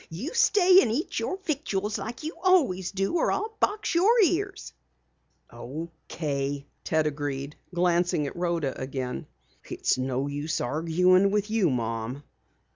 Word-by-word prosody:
You 200 - -5
stay 385 -5 +6
and 220 - 0
eat 285 +9 -2
your 375 - -2
victuals 215 - -2
like 225 +8 -6
you 315 +3 -4
always 270 - +3
do, 195 - 0
or - - +2
I'll 435 +1 -2
box 420 -1 0
your 410 +8 +4
ears." 390 +3 -1 0.8
"Okay," 145 -1 -5 0.2
Ted 160 -1 +1
agreed, 145 -1 -3 0.2
glancing 175 -2 +1
at 140 - -5
Rhoda 170 -6 -1
again. 130 -1 -4 0.4
"It's - - -1
no 130 +1 -1
use 145 +2 -3
arguing 170 +8 +3
with 210 +1 -1
you, 215 -6 +3
Mom." 115 +2 -3
175 Hz, 135 wpm, -27 LUFS, -, 0.8 s, stay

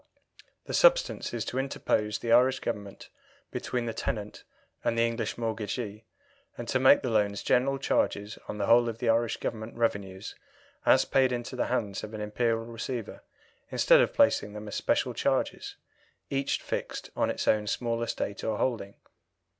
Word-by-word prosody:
The - - -6
substance - - +3
is - - -3
to 130 - -2
interpose 110 -5 0
the 115 - -3
Irish 130 +2 +5
Government 100 -4 -5 0.4
between 120 -1 -2
the 115 - -3
tenant 105 -1 -4 0.4
and 115 - 0
the 115 - +4
English 115 0 -2
mortgagee, 110 -1 -4 0.5
and 120 - -6
to 130 - +2
make 130 +2 +6
the 125 - -1
loans 105 -2 +1
general 135 +2 +2
charges 105 -5 -1
on 105 - -5
the 100 - -1
whole 120 +2 +5
of 115 - -5
the 120 -1 -1
Irish 115 0 +2
Government 110 +1 -5
revenues 100 -4 -2 0.5
as - - +6
paid 130 -1 +3
into 120 +1 -4
the 125 - 0
hands 110 -6 -2
of 110 +1 -7
an - - -6
Imperial 115 +2 0
Receiver 115 0 -5 0.5
instead - - +5
of - - +2
placing 280 - +3
them 105 0 -7
as 105 - -7
special - - 0
charges, - - -1 0.6
each 135 0 -1
fixed - - -4
on - - +1
its - - -3
own 105 -1 +3
small 115 +1 -1
estate 100 -3 -3
or 110 -1 -1
holding. 110 -6 -2
115 Hz, 170 wpm, -28 LUFS, 105-125 Hz, 0.6 s, make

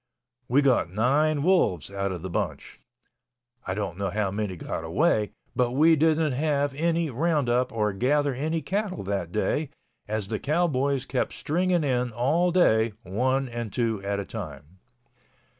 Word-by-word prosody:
We 140 +4 +3
got 125 -10 +3
nine 140 - +2
wolves 105 - +2
out 100 0 -2
of 90 -2 -6
the 95 - -4
bunch—I 120 +3 -7
don't 100 -3 -4
know 100 -1 -1
how 100 0 -1
many 100 -2 -3
got 80 - -5
away—but 120 - 0
we 160 +4 +5
didn't 160 0 +2
have 145 +1 0
any 165 +1 0
roundup 130 -3 +1
or 105 -3 0
gather 140 +7 +1
any 155 +5 -2
cattle 195 - -2
that 95 -3 -3
day, 140 - 0 0.4
as 105 -2 -3
the 110 - -2
cowboys 140 -4 0
kept - - -1
stringing 175 +2 0
in 125 -3 0
all 155 +10 +2
day, 115 - +3
one 130 +7 0
and 120 -3 -5
two 115 -2 -1
at 100 0 -1
a 100 - -4
time. 85 -5 -8
125 Hz, 150 wpm, -26 LUFS, 105-150 Hz, 0.4 s, we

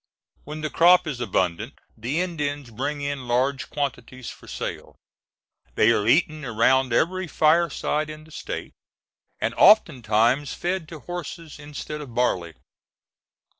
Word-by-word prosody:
When 150 +1 -7
the 155 - -3
crop 180 +2 +5
is 145 -6 -4
abundant 95 -7 -1 0.2
the 130 +10 -2
Indians 145 -7 -3
bring 140 +6 -3
in 140 -3 -4
large 130 +3 0
quantities 130 -3 -4
for - - -15
sale; - - -6 0.8
they 110 - +5
are 105 -2 +1
eaten 155 +3 +2
around 130 +2 +2
every 185 +9 +1
fireside 155 -1 +1
in 155 0 -9
the 160 - -18
State, - - -6 0.7
and - - -1
oftentimes 130 - +4
fed 175 -2 -3
to 160 -3 -9
horses 170 -3 -7
instead 150 +1 -7
of 125 -6 -10
barley. 90 -10 0
145 Hz, 130 wpm, -24 LUFS, 125-155 Hz, 0.8 s, crop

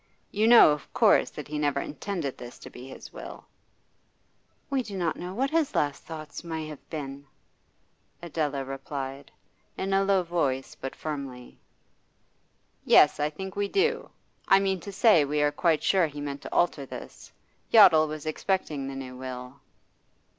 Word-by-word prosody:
You 215 +2 +2
know, 235 -9 +9
of 150 -1 -4
course, - - +4
that - - -9
he 150 0 -4
never 145 -2 +1
intended 155 -2 -4
this 120 0 -10
to - - -12
be 125 +1 -10
his 135 - -11
will?' - - -9 1.3
'We 270 -1 +1
do 205 -5 -7
not 170 -3 0
know 180 +2 -7
what 270 +5 0
his 320 -3 +1
last 145 -1 -1
thoughts 155 -2 -8
may 160 -2 -4
have 150 - -12
been,' 140 -2 -6 0.9
Adela 150 -5 -2
replied, 135 0 -6 0.5
in 195 +1 -2
a 195 0 +3
low 195 -2 +2
voice 145 -7 -1
but 135 - -7
firmly. 135 -5 -7 1.2
'Yes, 150 - +6
I 150 +1 +1
think 190 +5 -8
we 205 0 0
do. 465 - 0 0.4
I 195 - +6
mean 190 -1 0
to 200 - -8
say, 195 -5 +5
we 150 +1 -1
are 145 - +3
quite 160 +1 +1
sure 185 -4 +3
he 145 -1 -9
meant 140 -1 -5
to - - -9
alter 165 -5 +1
this. 135 - -10 0.4
Yottle 180 -8 +7
was 155 0 -7
expecting 155 -3 -2
the 135 - -6
new 130 -1 -7
will. 125 +1 -8
155 Hz, 165 wpm, -27 LUFS, 140-190 Hz, 1.3 s, know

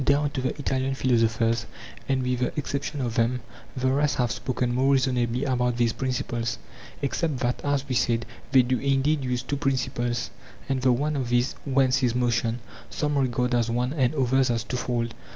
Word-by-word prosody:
Down 145 +1 +2
to 135 - -3
the 130 - 0
Italian 135 -2 -1
philosophers 115 -2 +1 0.4
and 135 -1 +1
with 125 -1 0
the 125 - 0
exception 145 0 -2
of 120 -3 -2
them 120 +2 +1 0.4
the 130 0 +1
rest 145 +2 +2
have 120 -3 +1
spoken 120 +4 -1
more 135 +3 +3
reasonably 125 -2 +1
about 125 -3 0
these 120 -2 +2
principles, 125 -3 -2 0.5
except 145 +1 0
that, 125 -1 -1
as 145 -1 0
we 130 - -2
said, 120 -1 +1 0.3
they 130 -2 +6
do 125 0 0
indeed 140 +2 +1
use 125 -1 -1
two 140 +2 -2
principles, 120 -3 -1 0.4
and 135 -1 0
the 130 0 +4
one 145 +5 0
of 130 -3 -2
these, 120 +1 +2
whence 135 -1 +3
is 120 -2 +1
motion, 120 -1 0 0.3
some 150 -1 -1
regard 125 -2 +1
as 120 -1 +2
one 125 +3 0
and 130 -2 +1
others 130 -1 +2
as 115 -2 0
twofold. 120 -1 -2
125 Hz, 185 wpm, -26 LUFS, 120-135 Hz, 0.5 s, they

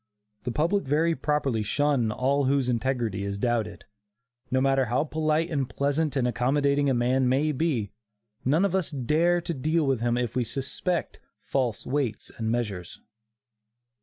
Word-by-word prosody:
The 125 - -1
public 170 - +1
very 160 +4 +2
properly 140 -8 0
shun 130 0 +1
all 135 +4 +1
whose 135 -1 +2
integrity 120 -5 -1
is 100 0 -3
doubted. 120 0 -1 0.6
No 130 0 +2
matter 135 0 +3
how 125 +4 +1
polite 155 +2 0
and 140 -4 -1
pleasant 145 +2 0
and 125 -3 +2
accommodating 140 +3 +1
a - - +3
man 125 +2 +2
may 145 +4 +2
be, 135 - -1 0.5
none 155 +9 +3
of 195 - -1
us 190 -4 0
dare 160 +6 +1
to 170 - -3
deal 155 +3 +1
with 135 -4 +1
him 120 0 +1
if 125 0 -2
we 125 - +2
suspect 140 +8 -3 0.2
"false 125 -5 -1
weights 130 -5 -2
and 110 -1 -2
measures." 105 -7 -3
135 Hz, 160 wpm, -26 LUFS, 120-150 Hz, 0.6 s, matter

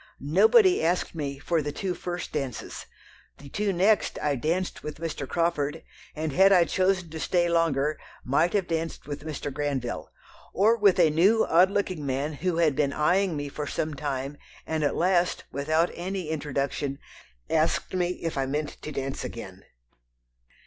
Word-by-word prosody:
Nobody 220 - +5
asked 175 +2 0
me 140 -4 -4
for 165 +3 0
the 145 0 -3
two 185 +4 -3
first 175 0 -5
dances; 135 -6 -5 0.5
the 140 - -12
two 205 +6 -1
next 195 +4 +2
I 145 -1 0
danced 170 +8 -2
with 150 -1 -6
Mr. 155 -4 -5
Crawford, 160 -4 0 0.3
and 155 -1 -3
had 190 +4 +6
I 180 -3 +7
chosen 185 -2 0
to 160 - -6
stay 175 +1 +1
longer 155 -3 +1 0.2
might 155 +7 +2
have 200 -3 +1
danced 165 0 -3
with 145 0 -6
Mr. 145 -2 -5
Granville... 140 -4 -3 0.4
or 215 +5 +4
with 205 -5 +4
a 165 -3 +5
new 195 +9 +4
odd 180 +3 +5
looking 195 -6 -2
man 140 +3 -2
who 170 +3 -2
had 160 -4 +3
been 140 -1 +1
eyeing 175 +2 +2
me 145 0 -3
for 145 +1 -5
some 155 +1 -2
time, 140 -1 -4 0.3
and 160 -1 -1
at 145 - +1
last, 180 0 +1
without 155 +5 +1
any 185 -1 -4
introduction, 140 -2 -2 0.5
asked - - 0
me 180 -1 +1 0.2
if 165 -4 -2
I 135 - 0
meant 150 +2 -3
to 155 - -6
dance 135 -1 -4
again." - - -8
160 Hz, 170 wpm, -27 LUFS, 145-180 Hz, 0.5 s, I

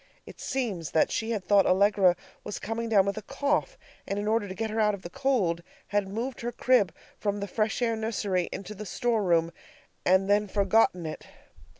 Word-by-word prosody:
It - - -12
seems 210 - -2
that 160 - +3
she 225 - -2
had 210 -5 -2
thought 200 0 +4
Allegra 195 -1 +4 0.3
was 210 - -5
coming 225 +2 -3
down 200 -4 +5
with 200 +1 -2
a - - -3
cough, 285 - -1 0.3
and 200 - -2
in 205 +1 -2
order 220 -1 +1
to 185 - -7
get 220 0 -3
her 220 - -2
out 210 -1 +3
of 190 - -14
the 175 - -8
cold, 245 -12 +1 0.3
had 205 -1 +1
moved 230 +6 -4
her 240 +1 -2
crib 240 -6 +3 0.3
from 205 -1 -1
the 200 - -2
fresh 215 +4 -1
air 230 -1 +1
nursery 205 -5 -1
into 200 +2 -6
the 210 0 -8
store 235 +1 0
room 170 -3 +2 0.5
and 190 +1 +3
then 205 +1 +3
forgotten 200 -3 +2
it. 155 0 -6
205 Hz, 205 wpm, -28 LUFS, 190-225 Hz, 0.5 s, down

